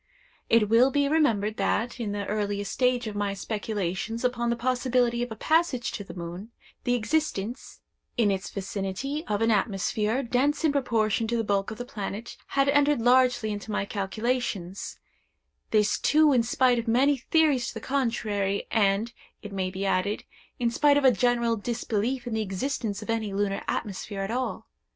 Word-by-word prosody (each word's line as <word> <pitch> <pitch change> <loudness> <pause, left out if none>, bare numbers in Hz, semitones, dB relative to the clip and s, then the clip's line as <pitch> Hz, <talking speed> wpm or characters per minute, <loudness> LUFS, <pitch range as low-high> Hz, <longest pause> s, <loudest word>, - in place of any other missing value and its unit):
It 225 -2 +4
will 230 +5 +5
be 285 +1 +1
remembered, 225 -9 +2
that, 245 +2 0
in 220 -4 -2
the 205 0 -3
earliest 205 -1 -2
stage 250 -1 +1
of 215 -1 -5
my 205 -1 -1
speculations 210 +1 -3
upon 240 -1 0
the 235 - +1
possibility 245 0 +1
of 245 -1 -3
a - - -4
passage 310 -1 +1
to 205 - -5
the 190 - -11
moon, 175 +4 -7 0.4
the 245 - +2
existence, 245 -3 -2 0.4
in 220 -4 +3
its 190 -1 -3
vicinity, 200 - -4
of 210 +1 0
an 225 - +3
atmosphere, 215 +4 0
dense 270 +5 +1
in 315 - +4
proportion 230 -5 +1
to 235 +1 0
the 225 - 0
bulk 200 -2 0
of 220 - -7
the 245 - -5
planet, 210 0 -6
had 275 0 +1
entered 290 -1 +3
largely 245 -2 +3
into 205 +1 -6
my 205 -1 -1
calculations; 200 -2 -3 0.7
this 215 -1 +2
too 305 -1 +4
in 245 - +4
spite 245 +1 +2
of 230 - -5
many 270 +5 +3
theories 280 -2 +2
to - - -6
the - - -4
contrary, 215 -7 -1
and, 215 +1 +2 0.3
it 205 -1 -8
may 190 -1 -1
be 190 +1 -4
added, 195 +2 0 0.3
in 235 -1 0
spite 285 +4 +4
of 285 - +2
a 260 - +8
general 235 +1 +2
disbelief 235 +2 -2
in 240 - -4
the 220 - 0
existence 210 +1 -3
of - - -12
any 220 -3 -2
lunar 200 0 -1
atmosphere 200 -1 -3
at 195 +2 -3
all. 255 +2 -2
230 Hz, 180 wpm, -27 LUFS, 205-250 Hz, 0.7 s, a